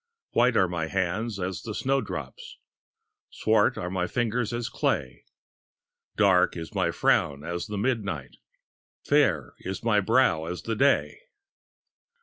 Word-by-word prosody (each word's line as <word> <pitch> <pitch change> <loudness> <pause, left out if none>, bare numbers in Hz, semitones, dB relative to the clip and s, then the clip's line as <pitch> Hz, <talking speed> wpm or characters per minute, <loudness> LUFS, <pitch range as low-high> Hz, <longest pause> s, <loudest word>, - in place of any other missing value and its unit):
White 120 0 +3
are 95 - +4
my 85 -2 -3
hands 95 +5 -2
as 90 0 -3
the 110 -2 -6
snowdrop; 135 +3 -2 1.0
Swart - - +2
are 90 +1 -4
my 90 -1 -1
fingers 120 0 -1
as 120 0 -3
clay; 65 -3 -2 0.9
Dark 95 -4 +4
is 80 -1 -7
my - - +1
frown 70 0 +1
as 85 +3 -4
the 105 -1 -4
midnight, 100 - -2 0.7
Fair - - +2
is 95 +4 -6
my 110 -3 +3
brow 100 -7 +2
as 90 +2 -5
the 115 - -2
day. 140 +5 +2
100 Hz, 130 wpm, -26 LUFS, 85-115 Hz, 1.0 s, are